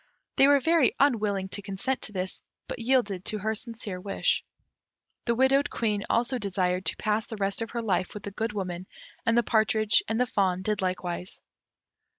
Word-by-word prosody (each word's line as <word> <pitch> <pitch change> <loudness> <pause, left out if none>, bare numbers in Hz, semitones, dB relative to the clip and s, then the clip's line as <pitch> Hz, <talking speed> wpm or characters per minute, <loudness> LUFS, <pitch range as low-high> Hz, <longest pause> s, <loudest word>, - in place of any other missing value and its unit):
They 270 - +7
were 285 0 +6
very 320 -1 +3
unwilling 210 -8 +2
to 205 - -4
consent 200 +7 -2
to - - -3
this, 185 -1 -4 0.3
but - - -5
yielded 230 -6 +1
to 215 - 0
her 215 +2 -1
sincere 215 -4 -5
wish. 195 - +1 0.8
The 235 - +1
widowed 270 +3 +3
Queen 210 -3 -1
also 245 +2 +1
desired 185 -3 -1
to - - +1
pass 215 +1 0
the 220 - -6
rest 195 +1 -1
of 225 - -3
her 235 -1 -3
life 190 -3 0
with 210 - -7
the 200 - -5
Good 220 +2 -2
Woman, 185 -2 -4 0.4
and 230 +1 +4
the 240 - +5
partridge 215 -1 +3
and 225 +2 -1
the 250 - +4
fawn 190 -6 0
did 210 0 -1
likewise. 180 -1 -3
215 Hz, 185 wpm, -27 LUFS, 190-235 Hz, 0.8 s, They